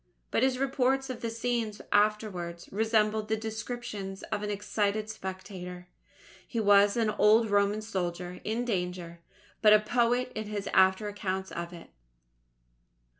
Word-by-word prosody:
But - - +2
his 260 -1 +2
reports 270 0 +1
of 245 - -7
these 230 -1 -4
scenes 230 -3 -1
afterwards, 205 -5 0
resembled 215 0 +1
the 220 0 0
descriptions 220 -3 -5
of - - -1
an 210 - -3
excited 205 +1 -1
spectator. 185 -3 -7 0.6
He 230 - -3
was 205 0 +5
an 225 -2 +2
old 215 +1 +4
Roman 205 +1 +2
soldier 180 -3 -4
in 230 +3 -1
danger, 180 -5 -3 0.4
but 215 -1 +7
a 215 - +8
poet 240 +3 +1
in 220 - -4
his 205 -1 -4
after 190 +2 +4
accounts 190 -2 -3
of 170 0 -5
it. 170 -2 -12
210 Hz, 140 wpm, -29 LUFS, 190-225 Hz, 0.6 s, a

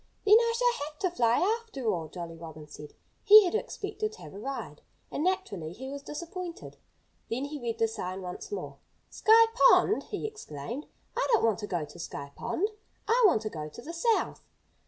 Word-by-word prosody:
"Then 420 +1 +8
I 465 0 +1
shall 480 -11 +1
have 300 0 -13
to 370 - +1
fly, 250 - +3
after 430 - -8
all," 165 -3 -3
Jolly 170 0 -7
Robin 160 -2 -10
said. 150 0 -11 0.3
He 425 -1 +10
had 355 - -1
expected 430 -1 -3
to - - -13
have - - -10
a 200 - -8
ride. 270 +5 -6 0.3
And 300 - -2
naturally 270 - -1
he 265 +7 -7
was 280 0 -6
disappointed. 340 +4 -7 0.5
Then 255 +4 -2
he 290 -1 -6
read 230 -1 -2
the 225 - +3
sign 185 -3 -5
once 180 - -7
more. 410 - -5 0.3
"Sky 455 +1 +6
Pond!" 430 -3 +5
he - - -5
exclaimed. 270 - -6 0.3
"I - - +1
don't 455 - +4
want 220 -4 +2
to 210 - -5
go 175 -6 -2
to 160 +4 -14
Sky 140 -4 -6
Pond. 410 +5 -1 0.4
I 475 +3 +4
want 225 - +2
to 215 - -2
go 155 -1 -5
to 195 - -11
the 335 - -7
South!" 435 +7 +1
285 Hz, 200 wpm, -29 LUFS, -, 0.5 s, He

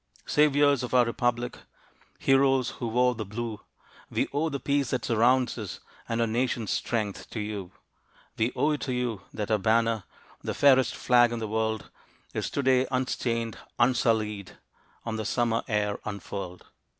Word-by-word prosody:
Saviors 145 -2 +4
of 125 0 -2
our 125 -1 +6
Republic, 120 +1 -1 0.6
Heroes 135 -1 +3
who 120 - -2
wore 125 +2 +3
the 115 -2 -4
blue, 110 +1 -5 0.5
We - - 0
owe 155 +3 +1
the 140 -2 -3
peace 140 0 0
that 125 -3 -1
surrounds 120 +2 +3
us 105 -4 -6 0.3
And 115 0 -1
our 115 - +3
Nation's 115 -2 -1
strength 105 +2 -2
to - - -5
you. 105 -3 -4 0.6
We 115 +3 +1
owe 150 - +2
it 150 - -2
to 130 - -2
you 120 -5 -2
that 105 0 -4
our 110 - +3
banner, 115 +1 +2 0.4
The - - -3
fairest 130 -2 +5
flag 120 -1 +4
in 120 - -2
the 110 -1 -3
world, 110 0 -2 0.4
Is - - -2
to 140 - -2
day 130 0 +3
unstained, 115 -3 -1 0.2
unsullied, 110 -5 +1 0.5
On 115 -1 -2
the 110 - -2
Summer 115 +1 +1
air 105 -2 0
unfurled. 100 -3 -6
115 Hz, 160 wpm, -27 LUFS, 110-130 Hz, 0.6 s, our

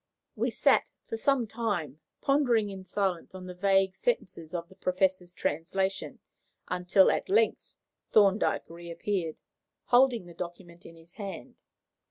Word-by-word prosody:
We - - 0
sat - - +3 0.2
for - - -4
some 255 +1 +2
time 200 - -3 0.2
pondering 245 -7 +2
in 190 -1 -8
silence 190 -2 -2
on 185 -1 -8
the 180 - -7
vague 195 +1 +2
sentences 180 - -2
of 170 -1 -3
the 190 - -17
Professor's 185 -1 0
translation, 190 +4 -2 0.5
until, 180 +2 +4
at - - -2
length, 440 +3 +1 0.4
Thorndyke 205 0 +3
reappeared, 170 0 -4 0.5
holding 245 -4 +4
the 175 - -12
document 175 0 -8
in 165 - -13
his 165 +1 -18
hand. 200 -2 -8
190 Hz, 135 wpm, -29 LUFS, 175-210 Hz, 0.5 s, until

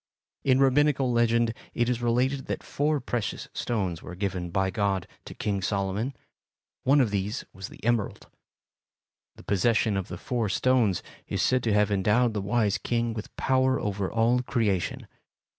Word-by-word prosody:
In 130 -1 +4
Rabbinical 135 -1 +3
legend 115 -1 +2 0.2
it 120 - +1
is 120 -1 0
related 125 +3 +1
that - - -3
four 150 +1 0
precious 120 -4 -3
stones 95 -8 -2
were 90 - -8
given 90 -2 -3
by 95 +2 0
God 100 -3 0 0.2
to - - -9
King 100 -2 -1
Solomon; 100 +6 -1 0.7
one 140 +3 +4
of 120 -6 +3
these 100 +3 -2
was 95 0 -7
the - - -13
emerald. 120 -3 0 1.1
The - - -14
possession 105 +1 +2
of 95 - -3
the - - -6
four 120 -4 -2
stones 115 -2 +2 0.2
is - - -1
said 130 0 +3
to 110 - +2
have 105 0 +3
endowed 105 +4 +2
the 105 - -2
wise 105 -1 +1
king 115 +2 -1
with 110 -1 -7
power 130 0 +2
over 100 -2 -2
all 115 +2 +3
creation. 110 -8 -1
115 Hz, 160 wpm, -27 LUFS, 100-125 Hz, 1.1 s, In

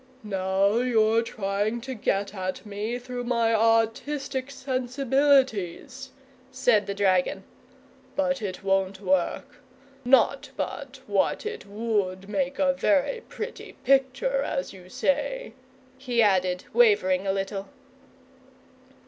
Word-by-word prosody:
"Now 195 +1 +1
you're 225 -2 +3
trying 205 +1 -2
to 260 +2 -5
get 200 -3 -1
at 185 +1 -4
me 210 +3 -3
through 245 0 -6
my 235 -2 +2
artistic 230 +5 +1
sensibilities," 265 - 0 0.4
said 245 -5 +2
the 200 - -3
dragon. 190 -3 +1 0.7
"But 275 -2 0
it 190 -3 -5
won't 195 0 0
work. 190 -3 -1 0.5
Not 255 +2 +3
but 275 -1 -5
what 205 - 0
it 435 - -6
would 200 -3 -2
make 275 +5 -2
a 275 -1 +3
very 300 - +1
pretty 445 +3 -7
picture, 270 0 +2
as 270 -4 -3
you 185 -1 -14
say," 290 - -1 0.5
he 245 -2 -2
added, 185 -3 +1
wavering 200 -5 +4
a - - +3
little. 195 0 -3
230 Hz, 115 wpm, -26 LUFS, 195-270 Hz, 0.7 s, wavering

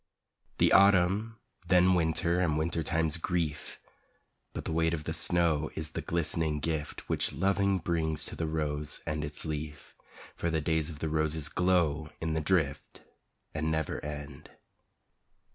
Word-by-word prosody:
The - - +4
Autumn, 100 +3 +4 0.3
then 90 0 +5
Winter 85 +1 +1
and 80 -4 +1
wintertime's 80 0 0
grief! 80 -3 -2 0.7
But - - -6
the - - -3
weight 80 +1 +2
of 75 - -6
the 80 - -3
snow 85 -2 +2
is 80 0 -3
the - - -4
glistening 80 -2 -1
gift 80 -1 -3
Which - - 0
loving 100 +1 +2
brings 80 -3 0
to - - -4
the 80 - -2
rose 75 -1 -3
and 75 0 -2
its 75 +2 -4
leaf, 75 -2 -5 0.4
For 85 - -1
the 80 -1 +1
days 80 0 0
of 80 - -8
the 80 +1 -3
roses 80 -1 0
glow 85 -4 +1
in 80 -1 -2
the 80 - 0
drift 75 -4 -1 0.5
And 80 +1 -1
never 80 0 -2
end. 75 -1 -7
80 Hz, 150 wpm, -30 LUFS, 75-85 Hz, 0.7 s, then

